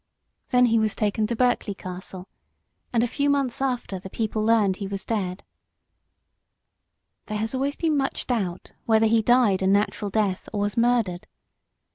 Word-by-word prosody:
Then 250 Hz, -1 st, +5 dB
he 230 Hz, -1 st, +3 dB
was 215 Hz, -1 st, 0 dB
taken 215 Hz, 0 st, 0 dB
to 235 Hz, -, -2 dB
Berkeley 245 Hz, -4 st, +1 dB
Castle, 185 Hz, 0 st, -8 dB, 0.6 s
and 235 Hz, -1 st, +2 dB
a -, -, +1 dB
few 285 Hz, +4 st, 0 dB
months 275 Hz, -3 st, 0 dB
after 245 Hz, -8 st, -2 dB
the 190 Hz, -, -9 dB
people 215 Hz, +1 st, -2 dB
learned 215 Hz, -3 st, +3 dB
that 185 Hz, -, -14 dB
he 200 Hz, -, -3 dB
was 195 Hz, 0 st, -5 dB
dead. 195 Hz, -4 st, -2 dB, 1.8 s
There 215 Hz, -, -3 dB
has 220 Hz, +3 st, -3 dB
always 275 Hz, +2 st, -1 dB
been 315 Hz, -3 st, 0 dB
much 270 Hz, -1 st, -2 dB
doubt 195 Hz, -8 st, -3 dB, 0.2 s
whether 220 Hz, -1 st, +4 dB
he 225 Hz, 0 st, +4 dB
died 230 Hz, -5 st, +3 dB
a 190 Hz, -, +1 dB
natural 205 Hz, +1 st, +1 dB
death 200 Hz, -2 st, -1 dB
or 205 Hz, -, -2 dB
was 205 Hz, 0 st, -1 dB
murdered. 230 Hz, -7 st, +1 dB
220 Hz, 170 wpm, -24 LUFS, 195-245 Hz, 1.8 s, Then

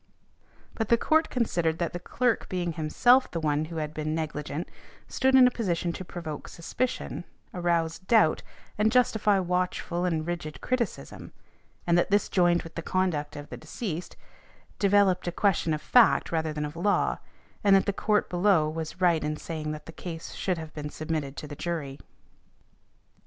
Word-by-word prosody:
But 225 Hz, -2 st, -3 dB
the 235 Hz, -, +5 dB
Court 315 Hz, +6 st, +2 dB
considered 170 Hz, -10 st, 0 dB
that 170 Hz, -1 st, -2 dB
the 175 Hz, -, -4 dB
clerk 240 Hz, +6 st, 0 dB
being 175 Hz, -2 st, -2 dB
himself 240 Hz, +12 st, +3 dB
the 165 Hz, -, -3 dB
one 150 Hz, -1 st, 0 dB
who 165 Hz, +1 st, -8 dB
had 155 Hz, -1 st, -3 dB
been 155 Hz, 0 st, -2 dB
negligent 155 Hz, 0 st, -4 dB, 0.4 s
stood 265 Hz, 0 st, +2 dB
in 260 Hz, -1 st, +8 dB
a 250 Hz, -, +4 dB
position 175 Hz, -7 st, -1 dB
to 185 Hz, -, -6 dB
provoke 165 Hz, -4 st, -7 dB
suspicion, 245 Hz, +9 st, -3 dB, 0.3 s
arouse 170 Hz, -2 st, 0 dB
doubt 190 Hz, -3 st, +3 dB, 0.4 s
and 215 Hz, +1 st, +3 dB
justify 220 Hz, -4 st, +3 dB
watchful 180 Hz, -1 st, -1 dB
and 165 Hz, -3 st, 0 dB
rigid 170 Hz, -3 st, -5 dB
criticism, 255 Hz, -4 st, -3 dB, 0.5 s
and 175 Hz, 0 st, +4 dB
that -, -, +1 dB
this 205 Hz, +1 st, +2 dB
joined 175 Hz, -2 st, +3 dB
with 165 Hz, -1 st, -11 dB
the 165 Hz, -, -4 dB
conduct 165 Hz, -5 st, -1 dB
of 145 Hz, 0 st, -8 dB
the -, -, -7 dB
deceased, 170 Hz, +1 st, -6 dB, 0.6 s
developed 195 Hz, -3 st, +3 dB
a -, -, 0 dB
question 175 Hz, -2 st, +1 dB
of 155 Hz, 0 st, -2 dB
fact 235 Hz, +4 st, +4 dB
rather 160 Hz, -1 st, 0 dB
than 150 Hz, 0 st, -3 dB
of 150 Hz, +1 st, -7 dB
law, 200 Hz, +4 st, +1 dB, 0.4 s
and 200 Hz, -1 st, +6 dB
that 195 Hz, -, +4 dB
the 200 Hz, -, 0 dB
Court 210 Hz, +1 st, +1 dB
below 175 Hz, -3 st, +3 dB
was 160 Hz, +3 st, -5 dB
right 170 Hz, -3 st, +3 dB
in 150 Hz, 0 st, -2 dB
saying 155 Hz, -2 st, -5 dB
that 150 Hz, -1 st, -7 dB
the -, -, -9 dB
case 165 Hz, -1 st, -7 dB
should 185 Hz, -2 st, -1 dB
have 160 Hz, -1 st, -8 dB
been 150 Hz, -1 st, -5 dB
submitted 155 Hz, -3 st, -4 dB
to -, -, -5 dB
the 145 Hz, -1 st, -8 dB
jury. 145 Hz, -5 st, -4 dB
170 Hz, 175 wpm, -27 LUFS, 155-200 Hz, 0.6 s, in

